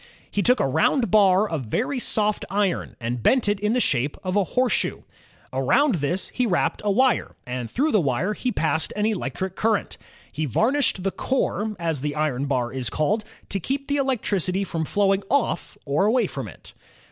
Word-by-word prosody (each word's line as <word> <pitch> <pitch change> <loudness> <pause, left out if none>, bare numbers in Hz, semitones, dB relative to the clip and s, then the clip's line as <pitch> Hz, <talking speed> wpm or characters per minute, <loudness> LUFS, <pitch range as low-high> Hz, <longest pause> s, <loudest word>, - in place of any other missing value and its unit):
He 205 - 0
took 250 +4 +3
a - - +2
round 160 - +2
bar 200 -1 +5
of 160 -9 -3
very 255 - -1
soft 215 -3 0
iron 195 -1 -1
and 120 0 -3
bent 255 - +3
it 205 -1 +1
in 210 +2 +1
the 250 - +2
shape 140 - +1
ki^cteomaoket 185 - -7
of 185 - -1
a 205 - +4
horseshoe. 250 +2 0 0.5
Around 240 - +3
this 175 +7 -1
he 250 -1 0
wrapped 180 -5 0
a 210 - 0
wire, 255 +5 +2
and 125 -2 -4
through 300 +5 +1
the 210 - +4
wire 145 +8 0
he 250 +4 -2
passed 160 -5 0
an 210 0 0
electric 190 - -2
current. 220 -1 0 0.3
He 155 - -2
varnished 225 - +1
the 195 - 0
core, 220 -4 -1
as 165 -5 -2
the 145 0 -2
iron 145 -3 -1
bar 125 -3 -1
is 130 -3 -2
called, 205 - 0 0.3
to 195 - -1
keep 275 - -3
the 285 - 0
electricity 200 - 0
from 165 -4 -3
flowing 195 +2 +2
off 275 0 0
or 150 +6 +1
away 235 +1 +3
from 135 - -5
it. 90 - -13
195 Hz, 195 wpm, -24 LUFS, 150-225 Hz, 0.5 s, bar